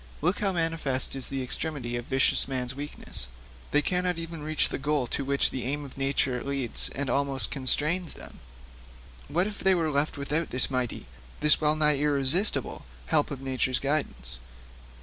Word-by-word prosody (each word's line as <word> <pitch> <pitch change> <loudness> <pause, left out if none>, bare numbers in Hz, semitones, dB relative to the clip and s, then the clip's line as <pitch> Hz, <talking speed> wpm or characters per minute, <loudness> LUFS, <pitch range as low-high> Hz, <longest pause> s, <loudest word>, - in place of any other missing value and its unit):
Look 180 +6 0
how 200 -2 +1
manifest 165 -7 -1
is 135 - -2
the 135 -1 -3
extremity 130 -2 -4
of 120 0 -4
vicious 135 0 +2
men's 130 -2 -3
weakness; 140 - 0 0.4
they 150 - +2
cannot 180 -1 0
even 165 -1 -6
reach 155 +1 +1
that - - -4
goal 145 -2 0
to 140 - -3
which 140 +1 +1
the 130 - -4
aim 145 +3 -3
of 135 - -11
nature 135 -2 0
leads 135 -4 +1
and 140 0 -3
almost 140 -1 0
constrains 150 +6 +2
them. - - -11 0.9
What 175 +3 +2
if 210 -1 -6
they 190 0 +4
were 160 -3 0
left 145 +2 0
without 150 +4 -2
this 130 +2 +1
mighty, 125 -2 -2 0.4
this 150 +1 +5
well 150 0 +3
nigh 150 -2 +3
irresistible 145 +6 +2 0.2
help 145 - +2
of 135 -2 -6
nature's 130 -1 0
guidance! 140 - -2
140 Hz, 170 wpm, -27 LUFS, 130-155 Hz, 0.9 s, this